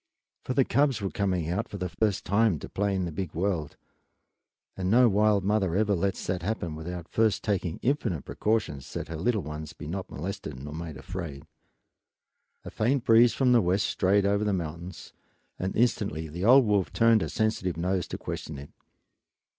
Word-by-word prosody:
For 130 - -3
the 135 - +4
cubs 140 -3 +2
were 100 -2 -3
coming 90 -5 -1
out 100 +8 -2
for 100 - -6
the 90 -1 -2
first 105 +2 -1
time 105 -3 +3
to - - -8
play 100 0 0
in 95 -1 0
the 85 - -4
big 85 +1 -5
world, 85 -4 -1 1.0
and 95 -1 -2
no 120 +4 +6
wild 105 -1 +3
mother 100 -3 +1
ever 105 0 +2
lets 95 +1 -1
that 90 -1 -2
happen 90 -4 -3
without 85 +1 -6
first 110 -2 +1
taking 95 -6 -1
infinite 115 - 0
precautions 100 - -1
that - - -5
her 80 - -4
little 105 +5 0
ones 75 0 -7
be - - -10
not 90 +5 -5
molested 75 - -6
nor 75 +2 -7
made 80 -2 -6
afraid. 80 -6 -7 1.2
A - - -7
faint 125 +3 +1
breeze 115 +1 +6
from 130 -2 +3
the 120 -2 +6
west 95 +2 +1
strayed 100 +1 +2
over 100 +1 +2
the 105 -1 +1
mountains 85 0 -6 0.5
and 95 +1 -2
instantly 105 -9 0
the 85 +5 -4
old 130 +2 +7
wolf 100 -3 +1
turned 115 -2 +4
her - - -2
sensitive 95 -6 -1
nose 90 +2 -1
to - - -5
question 75 - -6
it. 70 +1 -10
95 Hz, 185 wpm, -27 LUFS, 85-110 Hz, 1.2 s, old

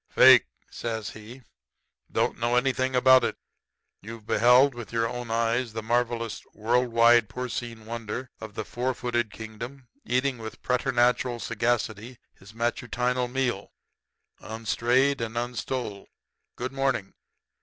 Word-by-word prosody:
"'Fake,' - - +7 0.2
says 110 -2 -4
he. 115 +4 -12 0.7
'Don't - - 0
know 120 +1 +1
anything 130 +1 +1
about 130 +1 +6
it. - - -1 0.6
You've 110 +1 -10
beheld 125 +5 +5
with 120 -2 -9
your 115 0 +1
own 120 0 -6
eyes 115 +1 0
the 110 -1 -4
marvelous, 115 0 -1
world 120 +4 +1
wide 115 -1 +5
porcine 120 -3 -5
wonder 115 +2 -5
of 110 -3 -9
the 110 - -4
four 125 +1 -2
footed 120 -3 -1
kingdom 115 +5 -9 0.2
eating 130 0 0
with 110 0 -9
preternatural 125 -1 +1
sagacity 115 0 -2 0.2
his 95 +2 -16
matutinal 125 +2 -1
meal, 125 -5 -2 0.7
unstrayed 120 +5 +1
and 115 0 -4
unstole. 120 -3 -4 0.5
Good 125 +2 -4
morning.' 135 -7 -1
120 Hz, 125 wpm, -26 LUFS, 115-125 Hz, 0.7 s, Fake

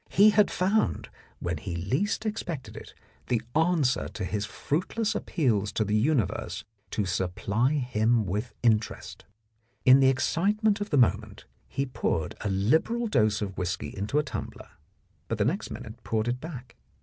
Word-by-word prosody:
He 210 +2 +6
had 210 0 +4
found, 185 - 0 0.3
when 85 -2 -2
he 85 +3 -5
least 135 - -1
expected 175 - -4
it, - - -10 0.3
the 120 - +2 0.2
answer 160 -6 +2
to 105 - -5
his 105 +2 -2
fruitless 210 +8 -1
appeals 120 - 0
to 110 - +1
the 105 - -1
universe 120 -1 0 0.3
to 105 - -1
supply 100 - 0
him 120 -5 +1
with 105 +6 -2
interest. 110 -2 0 0.6
In 130 +1 +8
the 135 -1 +6
excitement 205 - +1
of 205 - -3
the 145 - +1
moment 105 -3 +1 0.2
he 135 - -2
poured 115 - -1
a 105 - -1
liberal 155 - +2
dose 110 - +2
of 100 -2 -5
whisky 90 +1 -3
into 105 +8 -2
a 150 - +3
tumbler, 140 - -7 0.6
but 105 -3 0
next 170 - -1
minute 110 +1 -9
poured 110 0 -1
it 125 +1 -1
back. 135 -7 -9
125 Hz, 155 wpm, -27 LUFS, 105-160 Hz, 0.6 s, In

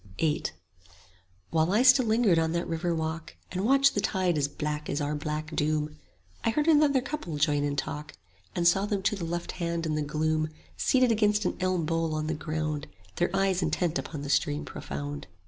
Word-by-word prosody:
VIII 155 -2 +1 1.1
While 160 +1 +2
I 215 +5 +4
still 255 -1 +6
lingered 220 -6 +4
on 160 0 0
that 170 0 -1
river 165 +1 -1
walk, 160 0 -4 0.2
And 185 +1 -2
watched 275 +4 +5
the 205 - 0
tide 185 -4 +1
as 145 -2 +1
black 150 +1 -4
as - - -1
our 145 0 -1
black 155 +1 -4
doom, 150 0 0 0.5
I - - +2
heard 295 +7 0
another 295 -4 +5
couple 250 - -5
join 145 -1 +2
in 145 0 -1
talk, 150 +1 -4 0.4
And 170 -1 +2
saw 195 +4 +3
them 200 -2 -1
to 210 - +2
the 180 -4 -4
left 175 +1 -3
hand 170 -2 -2
in 155 - -1
the 150 - 0
gloom 155 +1 0 0.3
Seated 255 -2 +3
against 210 -1 +2
an - - 0
elm 185 -3 0
bole 165 -1 0
on 155 0 -2
the 160 - -1
ground, 155 -1 -3 0.2
5 - - -28
Their 175 +2 +1
eyes 195 -1 +2
intent 175 -2 0
upon 145 -3 -6
the 145 - -5
stream 75 - +1
profound. 70 +1 -6
165 Hz, 200 wpm, -28 LUFS, 150-195 Hz, 1.1 s, still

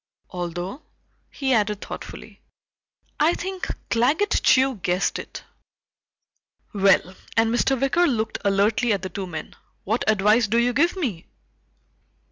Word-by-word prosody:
Although," 175 - -5 0.5
he 270 -2 -1
added 210 -3 +1
thoughtfully, - - -9 0.8
"I 320 +3 +3
think 375 +1 -5 0.2
Claggett 295 - +2
Chew 260 -2 +4
guessed 180 0 -1
it. - - -9 1.3
Well," 195 -2 +3 0.2
and 225 0 +3
Mr. 265 +2 +1
Wicker 340 +7 +2
looked 220 -4 -1
alertly 205 +3 +2
at 200 -1 -3
the 190 - -4
two 190 +2 -5
men, 160 -3 -7 0.3
"what 220 +5 -1
advice 210 +2 +3
do 225 +3 +1
you 240 +1 +2
give 330 +8 +2
me?" 240 - -4
225 Hz, 125 wpm, -23 LUFS, 195-270 Hz, 1.3 s, Chew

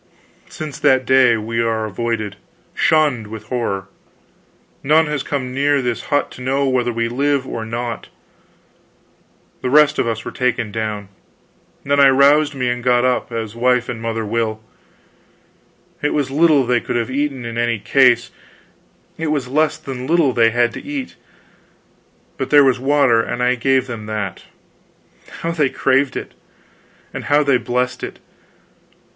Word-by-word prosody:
"Since 155 -2 -7
that 130 -1 +3
day 130 -3 +4
we 115 +2 -2
are 110 -1 -1
avoided, 110 -1 -3 0.4
shunned 145 -9 +2
with 110 0 -10
horror. 105 -6 -2 1.0
None 155 +3 +3
has 150 -2 -2
come 130 -2 -4
near 140 +1 +2
this 120 -3 -3
hut 145 - 0
to - - -11
know 135 +2 0
whether 125 -2 +1
we 115 0 -1
live 140 +3 0
or 115 -3 -5
not. 115 0 -4 1.5
The 125 - -2
rest 150 +2 +4
of - - +1
us 115 -1 -3
were - - -5
taken 125 -4 -1
down. 105 -2 -4 0.7
Then 140 +1 +1
I 140 -1 +7
roused 140 +2 +4
me 125 -2 -1
and 120 0 -2
got 125 0 +3
up, 125 -1 0
as 110 -2 -4
wife 125 +1 +1
and 115 -2 -5
mother 115 -1 -3
will. 110 0 -2 1.4
It 145 - 0
was 145 -3 -1
little 150 -2 +4
they 120 -1 +1
could - - -4
have 120 +2 -1
eaten 135 -2 -2
in 115 0 -4
any 120 -1 +1
case; 125 +2 +3 0.9
it 160 - -2
was 145 -4 -1
less 155 +3 +1
than 130 -4 -7
little 160 -5 +2
they 115 -1 +4
had 120 0 +1
to - - -8
eat. 280 -3 -5 1.2
But - - -2
there 145 -1 +7
was 130 -2 +2
water, 135 -4 +3
and 120 +1 -3
I 125 0 +3
gave 130 +1 +1
them 115 -4 -7
that. 105 -4 -4 1.0
How 165 - -1
they 150 -5 +1
craved 135 +1 +1
it! - - -6 0.8
and - - -6
how 145 +1 +3
they 140 -3 +3
blessed 125 +1 -2
it! - - -6
125 Hz, 160 wpm, -19 LUFS, 115-140 Hz, 1.5 s, I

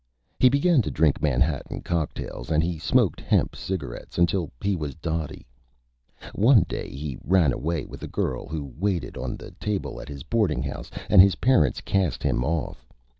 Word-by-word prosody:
He 130 - +7
began 140 +2 +3
to - - -3
drink 75 -2 +2
Manhattan 70 0 0
Cocktails, 80 -7 -3
and 80 0 +2
he 85 -1 -2
smoked - - +2
Hemp - - +1
Cigarettes 75 -11 -5
until 85 -1 +2
he 100 -1 0
was 75 -5 -4
Dotty. 80 -2 -4 0.9
One 110 -1 +5
Day - - -5
he 70 -2 -6
ran 85 -7 +3
away 80 +3 -2
with - - -11
a - - -5
Girl 65 - -2
who 75 -4 -5
waited 95 -3 -1
on - - -4
the - - -10
Table 105 -2 -3
at 65 - -10
his 70 -2 -7
Boarding 110 -4 +1
House, - - -6 0.2
and 95 - +8
his 95 0 +5
Parents 90 - +3
Cast 95 -4 0
him 60 - +1
Off. 80 +2 -2
80 Hz, 175 wpm, -25 LUFS, 75-95 Hz, 0.9 s, and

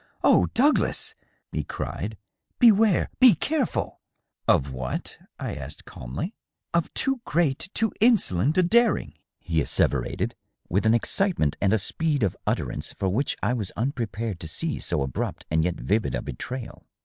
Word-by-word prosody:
" - - -37
Oh, - - +5
Douglas 290 +5 +3 0.4
I" - - -3
e - - 0
cried; - - -5 0.2
" - - -51
beware! 215 -3 +4
be 250 -4 +8
careful 295 -6 -1 0.2
!" - - -53
"Of 70 0 +3
what?*' 65 0 -5 0.2
I - - -4
asked 70 0 -8
calmly. 65 - -6 0.2
" - - -58
Of 170 -1 +1
too 270 -2 +2
great, 160 +1 0
too 225 -1 +1
insolent 160 - +3
a 185 - +5
daring," 215 - +3 0.3
he 80 -1 0
asseverated, - - 0 0.3
with 100 +5 +1
an 110 - +5
excite 190 - +1
ment 75 -2 +1
and 100 - +3
a 110 - +4
speed 145 - 0
of 100 - +1
utterance - - -2
for 95 - -1
which 125 +10 0
I 110 +5 +2
was 105 -7 -2
unprepared 115 - -2
to 80 - -6
see 155 - -3
so 75 -6 -1
abrupt 65 -2 -4
and 80 0 +3
yet 90 0 0
vivid 110 +2 0
a - - -3
betrayal. 125 - -7
115 Hz, 175 wpm, -25 LUFS, -, 0.4 s, be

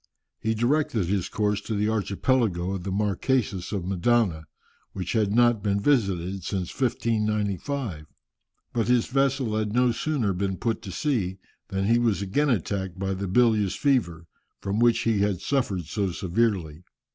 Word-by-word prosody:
He 110 +1 -1
directed 120 - +1
his 95 0 -1
course 105 -1 0
to 110 - -4
the 105 +1 +1
archipelago 100 -2 0
of 95 -2 -3
the 95 - -3
Marquesas 100 0 0
of 100 -4 -2
Mendana, 95 -3 +1 0.5
which 90 -2 -4
had 105 -3 +1
not 120 -1 +4
been 100 -1 0
visited 100 - +1
since 95 -1 -3
1595. 110 - -1 0.7
But 115 -2 0
his 125 -1 +3
vessel 135 -4 +1
had 105 -1 -2
no 125 0 +3
sooner 120 -6 -1
been 95 +1 -2
put 115 -2 -1
to 100 - -7
sea 100 - -1 0.3
than 95 0 -2
he 115 +3 +4
was 115 -4 +1
again 145 +10 +1
attacked 95 -4 -1
by 95 0 -2
the 95 +1 -3
bilious 105 -1 +3
fever, 95 - 0 0.3
from 100 +2 -2
which 120 -1 +4
he 115 -3 +1
had 100 -3 +1
suffered 100 -6 -1
so 100 +3 -1
severely. 90 -4 -1
105 Hz, 155 wpm, -26 LUFS, 95-120 Hz, 0.7 s, not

